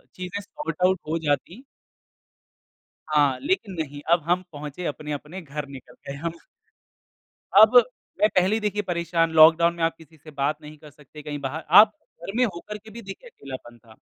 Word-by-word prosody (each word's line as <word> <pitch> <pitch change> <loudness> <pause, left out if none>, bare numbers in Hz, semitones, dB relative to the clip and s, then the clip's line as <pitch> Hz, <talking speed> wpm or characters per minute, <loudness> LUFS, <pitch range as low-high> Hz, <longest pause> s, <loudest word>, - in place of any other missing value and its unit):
चीज़ें 185 +2 -5
सॉर्ट-आउट 190 - -1
हो 165 - 0
जाती 170 - -2 1.4
हाँ, 145 -3 +2
लेकिन 275 - -1
नहीं 145 -2 -5
अब 170 -1 +4
हम 180 +1 +2
पहुँचे, 150 +4 -7
अपने-अपने 150 +4 -6
घर 150 -1 -6
निकल 135 -2 -12
गए 140 - -5
हम। 165 +3 -4 1.2
अब, 215 +4 +7 0.4
मैं 210 - +5
पहले 185 +4 +3
देखिए 210 -1 -1
परेशान, 170 -2 0
लॉकडाउन 160 +2 +6
में 170 - -6
आप 165 - 0
किसी 160 0 -18
से 155 +1 -14
बात 145 +1 -1
नहीं 150 +1 -11
कर 150 -1 -14
सकते 150 +1 -15
कहीं 145 -1 -5
बाहर 145 +4 -5 0.2
आप 215 0 +5 0.3
घर 175 +3 -7
में 250 - +4
होकर 210 0 -5
के 220 +1 -15
भी 235 +2 -10
देखिए 195 - -10
अकेलापन 130 - -10
था। 110 -1 -19
165 Hz, 170 wpm, -24 LUFS, 150-195 Hz, 1.4 s, अब